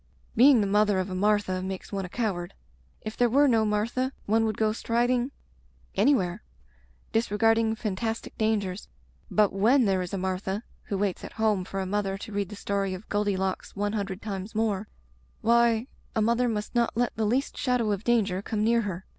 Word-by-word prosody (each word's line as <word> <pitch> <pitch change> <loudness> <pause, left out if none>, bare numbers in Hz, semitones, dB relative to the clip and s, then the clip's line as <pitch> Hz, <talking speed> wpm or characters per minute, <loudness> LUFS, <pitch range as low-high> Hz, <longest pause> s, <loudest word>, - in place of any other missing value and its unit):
Being 250 0 +7
the - - +1
mother 205 0 +3
of 185 0 -2
a - - -3
Martha 200 -1 +1
makes 190 0 -6
one 195 -2 -2
a - - -8
coward. 185 -6 -3 0.5
If 215 - -6
there 245 -1 +3
were 285 +5 +5
no 225 -4 +3
Martha 230 +5 0
one 225 +2 +2
would 215 -2 -2
go 215 -1 +2
striding 240 +2 +1 0.6
any 285 - +4
where, 180 -6 -2 0.7
disregarding 225 0 +2
fantastic 220 +1 -3
dangers, 210 -3 -1 0.4
but 210 -3 +3
when 235 +7 +4
there 190 -2 +2
is 180 - -5
a 195 - -2
Martha, 190 +3 -2 0.2
who 200 - -2
waits 195 -2 -1
at - - -8
home 215 -4 +1
for 195 - -4
a 190 - -1
mother 195 0 -1
to 210 - -9
read 200 -2 -2
the 210 - -7
story 200 -1 -1
of 185 +4 -11
Goldilocks 195 -2 -1
one 205 +1 -1
hundred 200 -2 -3
times 200 0 -5
more, 215 -2 0 0.5
why, 235 0 +3 0.3
a 220 - +2
mother 235 +2 +2
must 210 -2 -3
not 235 -2 +1
let 245 0 0
the 220 - 0
least 260 +6 0
shadow 250 -4 +1
of 200 0 -2
danger 210 -6 +1
come 210 +1 -2
near 230 +1 +3
her. 190 -3 -5
210 Hz, 190 wpm, -27 LUFS, 195-230 Hz, 0.7 s, Being